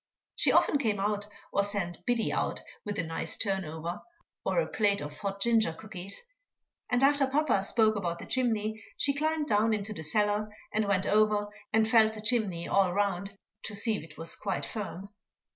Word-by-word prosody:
She - - +4
often 290 - +4
came 215 -7 0
out, 205 +1 -1 0.3
or 200 - +3
sent 200 -4 -2
Biddy 240 -2 +1
out - - -1 0.2
with 205 -1 -4
a - - 0
nice 165 0 -3
turn 195 -2 0
over, 160 +2 -5 0.4
or - - +1
a - - +2
plate 205 -2 +1
of 145 0 -7
hot 200 0 -3
ginger 220 -5 +3
cookies; 195 - -8 0.7
and 245 +1 +2
after 280 0 +4
papa 275 -6 +2
spoke 215 +2 +3
about 175 -4 -2
the - - -9
chimney, 220 -4 0
she 280 - +3
climbed 310 +1 0
down 220 -3 +2
into 210 +1 -4
the 180 - -6
cellar, 210 +6 0 0.2
and 215 0 +1
went 195 -2 +1
over 210 -1 +2 0.2
and 220 0 +3
felt 220 -2 +5
the 215 - -6
chimney 210 -7 +2
all 195 -2 +3
round 200 0 -1 0.3
to 215 - -4
see 215 +2 +3
if - - -4
it 155 -1 -13
was 165 +1 -2
quite 195 -3 -3
firm. 200 -3 -6
205 Hz, 190 wpm, -29 LUFS, 195-220 Hz, 0.7 s, felt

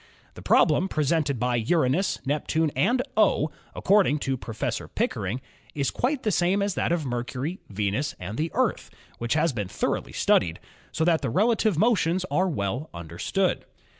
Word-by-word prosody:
The - - -11
problem 165 +5 +3
presented 150 -3 0
by 125 +1 +1
Uranus, 155 - +1
Neptune 150 +2 0
and 245 - +2
"O," 195 -7 +3 0.2
according 195 -6 +3
to 135 0 0
Professor 115 -3 -4
Pickering, 105 +7 -2 0.3
is 140 -3 0
quite 260 +2 -1
the 215 - +1
same 190 +2 +2
as 200 -1 0
that - - -1
of 170 -3 0
Mercury, 125 +7 -3
Venus 105 +7 -1
and 95 +4 -6
the 160 +5 -1
Earth, - - 0 0.3
which 120 +3 -1
has 160 -1 +2
been 105 -5 -3
thoroly 100 - -2
studied, 85 -2 +2 0.3
so 160 - 0
that 165 -2 +3
the 135 - -1
relative 215 - +2
motions 185 -4 +2
are 185 +1 +2
well 125 - -2
under 85 0 -9
stood. - - 0
150 Hz, 165 wpm, -26 LUFS, 120-180 Hz, 0.3 s, problem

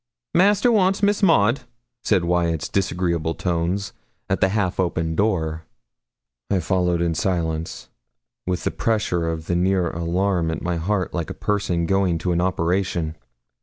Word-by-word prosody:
'Master 205 +6 +4
wants 195 -2 +2
Miss 205 0 +3
Maud,' 135 - +4 0.4
said 95 -5 +2
Wyat's 85 -2 0
disagreeable 85 -4 -1
tones, 90 +3 -1 0.4
at - - 0
the 95 - +4
half 100 -3 -1
open 85 -3 0
door. 80 -6 0 0.8
I 95 - +2
followed 90 0 +1
in 85 -1 +1
silence, 80 -2 -2 0.6
with 90 -1 -1
the - - 0
pressure 105 -8 0
of 80 -1 -4
a 85 - 0
near 90 -1 +1
alarm 85 +1 0
at 80 - -4
my 90 -1 -1
heart, 95 +3 -1
like 85 -2 -3
a - - -6
person 90 -5 -1
going 95 -2 +1
to 90 +2 -2
an 85 0 +1
operation. 90 -2 0
90 Hz, 150 wpm, -22 LUFS, 85-100 Hz, 0.8 s, Master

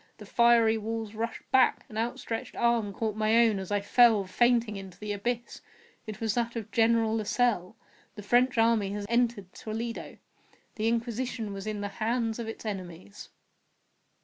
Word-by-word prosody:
The 210 - -11
fiery 230 0 +4
walls 220 0 -4
rushed 230 +1 -4
back! 260 -1 +3
An 215 - -12
outstretched 225 0 -3
arm 235 -3 +1
caught 215 +1 -3
my 215 +1 +2
own 225 -4 +4
as 190 +1 -7
I 205 -1 +1
fell, 220 -1 +4
fainting, 235 +2 +2
into 190 -2 -9
the 210 +1 -5
abyss. 235 +4 -4 0.5
It 215 -2 -6
was 225 -2 0
that 235 0 -1
of 225 -3 -5
General 225 -1 +3
Lasalle. 220 -3 0 0.4
The 205 - -9
French 245 +4 +3
army 225 -3 +2
had 205 0 -4
entered 235 -5 0
Toledo. 230 +2 -6 0.6
The 220 +1 -2
Inquisition 230 -1 -2
was 195 +1 -7
in 210 -1 -3
the 205 - -3
hands 230 0 0
of 230 - -4
its 225 - -7
enemies. 175 - -7
225 Hz, 165 wpm, -28 LUFS, 205-235 Hz, 0.6 s, fiery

